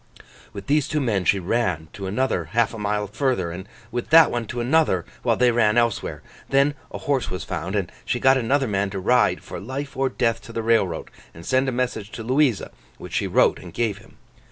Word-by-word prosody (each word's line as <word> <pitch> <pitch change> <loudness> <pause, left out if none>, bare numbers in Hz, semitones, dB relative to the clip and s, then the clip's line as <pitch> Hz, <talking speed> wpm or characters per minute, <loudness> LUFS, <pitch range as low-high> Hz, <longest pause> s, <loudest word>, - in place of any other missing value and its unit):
With 100 - -8
these 145 0 +2
two 155 - -1
men 105 -9 0
she 100 - +4
ran 90 -4 -1
to 100 -1 -6
another 100 -4 0
half 115 +8 +1
a 115 - -7
mile 105 0 -1
further, 105 -4 -1
and 95 +4 -8 0.2
with 120 0 -4
that 165 -1 +7
one 120 -2 -2
to 120 - -5
another, 120 - +2 0.2
while - - +2
they 125 -1 +4
ran 115 -2 +3
elsewhere. 120 -3 0 0.3
Then 140 +2 +3 0.2
a - - -6
horse 140 -4 -1
was 90 - -4
found; 95 +4 -4
and 100 -4 -1
she - - -1
got 135 0 +5
another 135 +2 +1
man 100 -1 0
to 95 0 -4
ride 125 +6 +2
for - - -7
life 135 +6 -6
or 135 0 +1
death 115 -3 0
to - - -10
the 115 0 -3
railroad, 110 -8 +1 0.2
and 85 +1 -11
send 130 +1 +2
a - - -1
message 120 -5 -2
to 115 - -6
Louisa, 130 -2 +1 0.3
which - - -10
she - - 0
wrote - - +3
and - - -12
gave 110 -4 -1
him. 100 - -19
115 Hz, 220 wpm, -23 LUFS, 100-130 Hz, 0.3 s, that